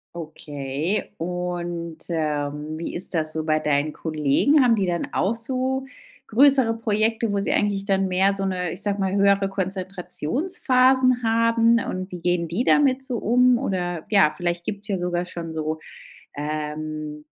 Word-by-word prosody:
Okay. 150 +2 -4
Und, 175 -1 -4
ähm, 150 -1 -2
wie 165 - -5
ist 180 - -6
das 155 -2 -1
so 160 0 -3
bei 155 -1 +2
deinen 150 0 0
Kollegen? 155 - +2
Haben 245 -3 +5
die 200 -3 0
dann 175 -1 -1
auch 225 +4 +1
so 260 +2 -2 0.4
größere 265 -1 +4
Projekte, 220 0 0
wo 200 - 0
sie - - -1
eigentlich 200 -1 0
dann 195 -1 +1
mehr 190 +2 +2
so 195 0 -2
'ne- 180 -3 -2
ich - - -7
sage 205 -1 -1
mal- 190 -1 0
höhere 200 0 +3
Konzentrationsphasen 245 - +1
haben 230 0 +3
und 185 +1 -5
wie 180 - -6
gehen 175 0 0
die 185 +9 0
damit 270 -2 +3
so 250 -3 -3
um 250 +2 +4
oder, 175 -8 -2
ja, 195 -8 +5
vielleicht 175 0 -2
gibt's 210 0 -5
ja 195 - 0
sogar 175 0 -1
schon 170 -2 -7
so, 155 0 -3 0.6
ähm, 150 0 -4
185 Hz, 160 wpm, -23 LUFS, 160-225 Hz, 0.6 s, Haben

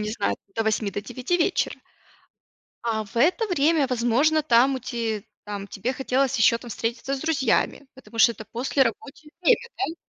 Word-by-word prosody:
не 210 0 -2
знаю, 215 -2 -1 0.2
до 225 - -1
8, 215 -1 0
до 205 - -4
9 260 - -2
вечера. 360 +2 0 1.1
А 220 -2 -1
в 205 - -16
это 365 - +3
время, 310 -3 +3
возможно, 255 +6 +2
там 260 0 +4
у - - -3
ти 225 -4 -3 0.2
там 205 -1 -6
тебе 235 +7 -3
хотелось 265 0 0
еще 230 +1 +5
там 240 -1 -11
встретиться 235 +5 -3
с 270 - -5
друзьями, 285 -3 0
потому 250 -3 -13
что 235 +1 +6
это 220 -1 -11
послерабочее 275 +4 -1
время, 470 +7 +3
да. 355 -4 -2
250 Hz, 175 wpm, -24 LUFS, 225-285 Hz, 1.1 s, что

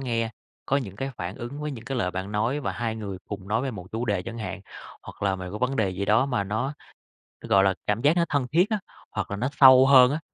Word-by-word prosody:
nghe, 115 -3 -1 0.4
có 135 - +2
những 100 -8 -4
cái 135 +3 -3
phản 90 +2 -5
ứng 125 +5 -7
với 150 0 -3
những 120 -4 -8
cái 135 -1 -3
lời 90 -5 0
bạn 95 +3 -5
nói 115 +8 0
và - - -2
hai 115 -2 -3
người 100 -4 -6
cùng 100 -1 -7
nói 110 +4 +1
về 135 - -2
một 95 -6 -8
chủ 115 +2 -2
đề 100 -6 0
chẳng 115 +1 -7
hạn. 95 -2 -5 0.4
Hoặc - - -11
là 95 -1 +1
mày 90 -1 -7
có 105 - -5
vấn 125 +3 0
đề 105 -5 +1
gì 95 +2 -3
đó 115 +6 +3
mà 125 -7 -1
nó, 110 +8 -2 0.7
gọi 95 0 +3
là, 95 -1 +3
cảm 105 +2 0
giác 150 +6 +3
nó 170 - +3
thân 140 -3 0
thiết 180 +7 +3
á, 215 - 0 0.3
hoặc - - -4
là 100 - -2
nó 125 +5 -1
sâu 130 -1 +9
hơn 130 -1 +7
á, 155 - -1
115 Hz, 275 wpm, -25 LUFS, 100-135 Hz, 0.7 s, sâu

